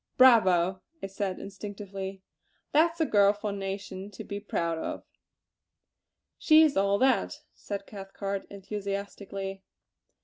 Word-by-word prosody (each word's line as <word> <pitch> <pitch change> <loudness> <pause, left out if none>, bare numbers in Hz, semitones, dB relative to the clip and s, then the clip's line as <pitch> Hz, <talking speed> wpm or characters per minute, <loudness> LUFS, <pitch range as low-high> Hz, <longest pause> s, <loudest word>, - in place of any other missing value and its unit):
"Bravo!" 190 -8 +5 0.2
I - - 0
said 195 -1 -3
instinctively! 195 -1 -7 0.5
"That's 330 +3 +3
a 320 - +3
girl 205 -5 +5
for 210 0 -4
a - - -4
nation 195 0 -5
to 205 - -9
be 200 0 -5
proud 170 -5 -2
of!" - - -4 1.4
"She 315 0 +7
is 305 -3 +3
all 200 +1 +3
that!" 260 +4 +2
said 200 -1 -6
Cathcart 195 -1 -5
enthusiastically. 200 -1 -5
200 Hz, 125 wpm, -28 LUFS, 195-205 Hz, 1.4 s, She